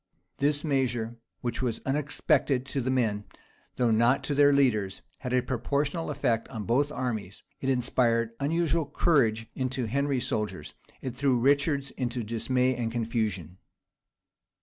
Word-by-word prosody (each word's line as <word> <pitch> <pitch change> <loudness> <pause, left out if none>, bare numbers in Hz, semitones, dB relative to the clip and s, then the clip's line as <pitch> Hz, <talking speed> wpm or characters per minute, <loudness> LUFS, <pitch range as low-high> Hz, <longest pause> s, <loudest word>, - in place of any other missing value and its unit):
This 145 +1 +1
measure, 120 -6 0 0.2
which 120 +1 -2
was 120 -3 -1
unexpected 140 -1 +1
to 135 0 -2
the 130 - -2
men, 110 -6 +1 0.5
though 120 -2 +2
not 120 +4 +3
to 145 - -1
their 145 0 +6
leaders, 110 -9 +1 0.2
had 125 - -5
a 125 -1 +2
proportional 140 +6 -1
effect 120 -6 0
on 110 -2 -6
both 135 +7 +1
armies: 115 -8 -4 0.2
it 135 - -2
inspired 120 -2 +2
unusual 165 +2 +1
courage 115 -9 +2
into 130 -1 -2
Henry's 135 +2 0
soldiers; 95 -8 -3 0.3
it 130 -2 -4
threw 130 -1 +2
Richard's 140 +2 +2
into 125 -1 -3
dismay 125 +4 +1
and 115 -1 -2
confusion. 110 -7 -2
125 Hz, 140 wpm, -28 LUFS, 115-140 Hz, 0.5 s, their